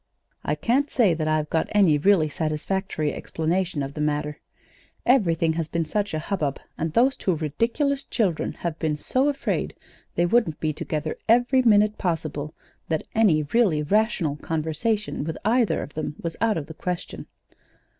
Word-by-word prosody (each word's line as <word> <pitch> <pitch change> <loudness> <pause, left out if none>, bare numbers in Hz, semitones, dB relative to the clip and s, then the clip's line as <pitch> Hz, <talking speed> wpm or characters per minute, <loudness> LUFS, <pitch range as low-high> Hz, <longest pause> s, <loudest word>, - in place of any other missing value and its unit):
"I - - 0
can't 275 +5 +1
say 215 -8 +3
that 160 -1 -2
I've 155 -1 0
got 160 - +1
any 185 -8 +4
really 185 -1 +4
satisfactory 155 +1 -2
explanation 165 -1 -1
of 135 +1 -5
the 150 - -4
matter. 150 0 -1 0.7
Everything 170 -10 +3
has 165 -1 -2
been 170 +1 -1
in 155 - -11
such 205 -3 -1
a - - 0
hubbub, 155 -4 -2 0.2
and 160 0 -2
those 255 - +3
two 185 - 0
ridiculous 235 - 0
children 190 -9 0
have 170 -2 -4
been 155 -2 0
so 260 - +1
afraid 280 -1 -2 0.4
they 175 - +3
wouldn't 185 -5 +2
be 155 -1 -1
together 155 +1 -3
every 245 +3 +4
minute 210 -3 +4
possible, 155 -4 -2 0.3
that 160 -2 0
any 190 -9 +4
really 195 -11 +3
rational 185 -4 +1
conversation 160 +7 -2
with 160 +1 -4
either 235 0 +2
of 145 - -10
them 155 -1 -4
was 165 -1 -4
out 225 -4 +2
of 150 - -3
the 160 - -9
question. 180 +2 -5
165 Hz, 165 wpm, -24 LUFS, 155-215 Hz, 0.7 s, any